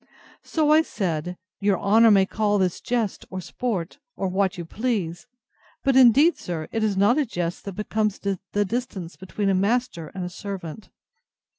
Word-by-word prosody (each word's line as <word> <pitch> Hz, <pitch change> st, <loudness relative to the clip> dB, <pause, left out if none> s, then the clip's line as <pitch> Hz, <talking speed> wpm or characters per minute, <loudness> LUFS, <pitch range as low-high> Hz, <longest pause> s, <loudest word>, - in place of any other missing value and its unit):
So 305 Hz, -2 st, +1 dB
I 310 Hz, +1 st, +7 dB
said, 180 Hz, -, -3 dB, 0.2 s
Your 200 Hz, -2 st, +1 dB
honour 225 Hz, +3 st, +5 dB
may 195 Hz, -2 st, +5 dB
call 205 Hz, +1 st, 0 dB
this 185 Hz, -3 st, 0 dB
jest 235 Hz, -5 st, -1 dB
or 185 Hz, -, -5 dB
sport, 200 Hz, -, -4 dB, 0.2 s
or 195 Hz, -, -2 dB
what 190 Hz, +1 st, 0 dB
you 170 Hz, -, -5 dB
please; 205 Hz, -2 st, -2 dB, 0.6 s
but 270 Hz, -2 st, +2 dB
indeed, 265 Hz, +6 st, +6 dB
sir, 160 Hz, -3 st, -4 dB
it 225 Hz, -, -1 dB
is 205 Hz, -3 st, 0 dB
not 210 Hz, +9 st, +4 dB
a 295 Hz, -, +2 dB
jest 175 Hz, -3 st, -4 dB
that 200 Hz, -, -5 dB
becomes 210 Hz, +1 st, -1 dB
the 200 Hz, -2 st, -2 dB, 0.3 s
distance 200 Hz, -6 st, -4 dB
between 195 Hz, +2 st, -3 dB
a -, -, +3 dB
master 200 Hz, -3 st, 0 dB
and 185 Hz, -, -3 dB
a -, -, -4 dB
servant. 195 Hz, 0 st, -7 dB
200 Hz, 170 wpm, -24 LUFS, 185-230 Hz, 0.6 s, I